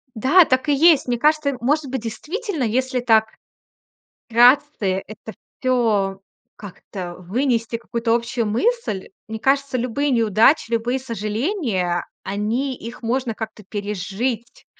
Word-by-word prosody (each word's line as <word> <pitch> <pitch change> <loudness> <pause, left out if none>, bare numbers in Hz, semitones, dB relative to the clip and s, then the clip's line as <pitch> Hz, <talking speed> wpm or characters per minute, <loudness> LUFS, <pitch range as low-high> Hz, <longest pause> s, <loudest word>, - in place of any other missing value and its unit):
Да, 285 - +5
так 260 +3 0
и 290 - +4
есть. 310 -1 +5
Мне 245 - 0
кажется, 305 +1 +3
э, 265 - -3
может 280 +2 0
быть, 265 -3 -2
действительно, 320 - -4
если 255 +3 0
так 225 -2 +4 1.0
вкратце, 235 -5 +3
это 215 +1 -10 0.3
всё 215 -7 +1 0.4
как-то 185 -3 -8
вынести 230 +5 -1
какую-то 230 0 -1
общую 235 -1 -1
мысль, 235 - -1 0.2
мне 220 0 -5
кажется, 275 +2 +1
любые 255 +4 -1
неудачи, 230 +2 +3
любые 235 +3 0
сожаления- 220 - -2 0.2
они 225 +7 -2
их 235 +2 -9
можно 240 0 -1
как-то 220 -1 -7
пережить, 210 +4 -4
235 Hz, 125 wpm, -21 LUFS, 215-265 Hz, 1.0 s, Да